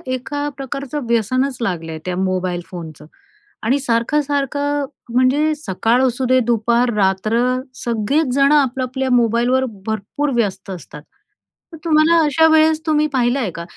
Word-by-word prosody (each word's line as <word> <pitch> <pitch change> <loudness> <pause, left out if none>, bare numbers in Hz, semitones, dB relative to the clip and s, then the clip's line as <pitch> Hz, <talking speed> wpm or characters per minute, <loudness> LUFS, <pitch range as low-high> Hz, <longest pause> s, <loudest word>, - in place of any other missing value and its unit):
एका 290 +3 -4
प्रकारचं 275 0 -5
व्यसनच 255 +4 0
लागलं 170 -7 -3
आहे, 160 - -6
त्या 180 -1 -2
मोबाईल 185 -1 -2
फोनचं. 160 -4 -9 0.6
आणि 260 +6 +2
सारखं-सारखं, 285 +3 0 0.3
म्हणजे 275 +5 +3
सकाळ 235 -1 0
असूदे, 255 +1 +1
दुपार, 235 +2 +1
रात्र, 200 +3 +1 0.5
सगळेच 235 +7 0
जणं 280 +2 +4
आपल्या 265 -2 +1
आपल्या 265 +1 -3
मोबाईलवर 245 +2 +2 0.2
भरपूर 220 +7 -2
व्यस्त 195 -4 -1
असतात. 155 -4 -9 0.7
तर - - -8
तुम्हाला 320 +1 +4
अशा 300 +2 +3
वेळेस 315 0 +4
तुम्ही 305 -1 +2
पाहिलं 250 +1 +1
आहे 230 -7 -1
का, 170 - -5
255 Hz, 135 wpm, -19 LUFS, 215-285 Hz, 0.7 s, जणं